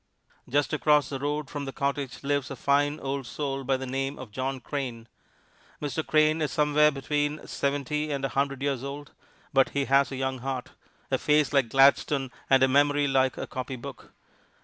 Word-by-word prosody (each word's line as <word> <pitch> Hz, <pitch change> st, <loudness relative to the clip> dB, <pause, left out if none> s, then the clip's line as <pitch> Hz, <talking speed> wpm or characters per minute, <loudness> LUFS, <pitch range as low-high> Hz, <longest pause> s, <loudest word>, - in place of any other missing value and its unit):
Just 145 Hz, +3 st, +1 dB
across 150 Hz, -1 st, +3 dB
the 135 Hz, -, -4 dB
road 145 Hz, +1 st, -2 dB
from 145 Hz, +1 st, -5 dB
the 135 Hz, -, -4 dB
cottage 140 Hz, -1 st, -3 dB
lives 140 Hz, -1 st, 0 dB
a 135 Hz, -, -5 dB
fine 145 Hz, +3 st, +1 dB
old 135 Hz, -1 st, -3 dB
soul 135 Hz, -2 st, -3 dB
by 135 Hz, 0 st, +1 dB
the 130 Hz, -, -5 dB
name 135 Hz, +2 st, -3 dB
of 130 Hz, -5 st, -9 dB
John 130 Hz, +3 st, -3 dB
Crane. 125 Hz, -4 st, -5 dB, 0.7 s
Mr. 150 Hz, +2 st, -2 dB
Crane 155 Hz, +1 st, +3 dB
is 150 Hz, -, 0 dB
somewhere 150 Hz, -2 st, +4 dB
between 145 Hz, +1 st, -2 dB
seventy 145 Hz, +2 st, -2 dB
and 140 Hz, -1 st, -1 dB
a -, -, -1 dB
hundred 140 Hz, +1 st, -1 dB
years 135 Hz, -3 st, -1 dB
old, 140 Hz, +1 st, -7 dB, 0.4 s
but 135 Hz, -1 st, +4 dB
he 140 Hz, -, +2 dB
has 135 Hz, +1 st, +3 dB
a -, -, -4 dB
young 130 Hz, 0 st, -2 dB
heart, 130 Hz, 0 st, -4 dB, 0.4 s
a -, -, +2 dB
face 150 Hz, -1 st, +2 dB
like 135 Hz, -5 st, +3 dB
Gladstone 135 Hz, 0 st, +4 dB, 0.2 s
and 135 Hz, -1 st, +5 dB
a -, -, +6 dB
memory 145 Hz, +2 st, +3 dB
like 130 Hz, -1 st, +2 dB
a -, -, -3 dB
copy 130 Hz, +1 st, -5 dB
book. 130 Hz, 0 st, -10 dB
140 Hz, 190 wpm, -27 LUFS, 135-145 Hz, 0.7 s, a